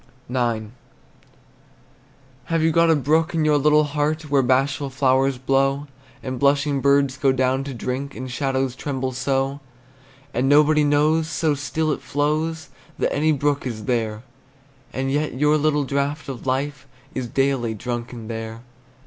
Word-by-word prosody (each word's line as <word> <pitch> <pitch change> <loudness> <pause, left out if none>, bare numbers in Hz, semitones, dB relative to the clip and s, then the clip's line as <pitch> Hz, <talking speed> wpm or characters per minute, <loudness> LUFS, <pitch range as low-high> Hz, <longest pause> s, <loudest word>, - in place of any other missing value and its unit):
IX. 120 -4 -1 1.8
Have 165 -1 0
you 160 - +3
got 165 +1 +4
a 160 - +5
brook 155 +4 +1
in 160 -1 +1
your 150 -1 +4
little 150 +1 +4
heart, 150 +1 -2
Where 140 -1 +4
bashful 135 +2 +1
flowers 135 0 +2
blow, 135 +2 +1 0.4
And 130 -1 -4
blushing 140 0 +2
birds 140 -1 +3
go 140 -2 +3
down 130 +1 +1
to 140 - -5
drink, 130 +3 -4
And 130 0 -6
shadows 135 -1 -1
tremble 130 -2 -3
so? 135 +1 -1 0.7
And 130 +3 +1
nobody 150 +1 +5
knows, 150 +2 +2
so 160 -1 +1
still 155 +2 -1
it - - -3
flows, 155 +2 -1 0.3
That - - 0
any 155 +2 +2
brook 145 -1 0
is 110 -4 -6
there; 110 -2 -1 0.7
And 135 +1 -2
yet 150 0 -1
your 150 +3 +3
little 150 -1 +2
draught 140 +2 -2
of 135 -1 -7
life 135 +1 -2 0.3
Is 130 -2 -3
daily 130 -3 0
drunken 120 0 -5
there. 115 0 -6
140 Hz, 150 wpm, -22 LUFS, 130-150 Hz, 1.8 s, a